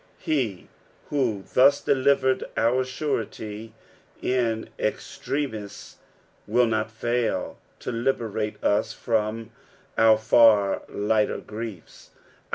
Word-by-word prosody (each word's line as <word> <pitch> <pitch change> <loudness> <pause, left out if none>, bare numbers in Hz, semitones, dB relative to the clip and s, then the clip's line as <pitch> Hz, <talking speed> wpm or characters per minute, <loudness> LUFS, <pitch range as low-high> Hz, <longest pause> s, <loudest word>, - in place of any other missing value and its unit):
He 130 - -2 0.4
who 120 -9 0
thus 140 +2 +6
delivered 130 -1 +2
our 125 +3 +2
surety 115 -5 -4 0.4
in 115 -3 0
extremi*, 110 -8 -4 0.5
will 120 +3 +3
not 110 -1 0
fail 120 +1 -2 0.2
to - - -4
liberate 115 -3 -1
us 110 +2 +1
from 110 0 -2 0.5
our 110 -1 +6
far 110 -2 +4
lighter 105 +1 +1
griefs. 105 -5 -9
115 Hz, 90 wpm, -25 LUFS, 110-125 Hz, 0.5 s, thus